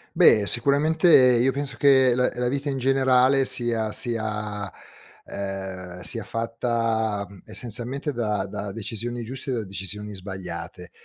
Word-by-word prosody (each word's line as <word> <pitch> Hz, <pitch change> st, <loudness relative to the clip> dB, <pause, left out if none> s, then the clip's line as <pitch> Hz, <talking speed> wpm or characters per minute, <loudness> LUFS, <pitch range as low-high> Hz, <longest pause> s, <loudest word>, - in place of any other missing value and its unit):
Beh, 105 Hz, -1 st, +4 dB
sicuramente 145 Hz, -, +5 dB
io 125 Hz, -2 st, +4 dB
penso 140 Hz, -1 st, -2 dB
che 130 Hz, 0 st, +3 dB
la 125 Hz, +1 st, 0 dB
la 125 Hz, 0 st, -2 dB
vita 140 Hz, +3 st, -3 dB
in 135 Hz, -, -3 dB
generale 130 Hz, 0 st, +2 dB
sia 115 Hz, -4 st, +3 dB
sia 105 Hz, -3 st, -1 dB, 0.5 s
ehm, 95 Hz, -2 st, -7 dB
sia 105 Hz, +6 st, +1 dB
fatta, 115 Hz, -2 st, -3 dB
mhmm, 100 Hz, 0 st, -16 dB
essenzialmente 125 Hz, +5 st, 0 dB
da 105 Hz, -5 st, -3 dB
da 100 Hz, +1 st, -7 dB
decisioni 115 Hz, +3 st, -5 dB
giuste 130 Hz, +4 st, -6 dB
e -, -, -1 dB
da 115 Hz, -, -4 dB
decisioni 100 Hz, +2 st, -5 dB
sbagliate. 95 Hz, -3 st, -8 dB
115 Hz, 135 wpm, -23 LUFS, 105-130 Hz, 0.5 s, sicuramente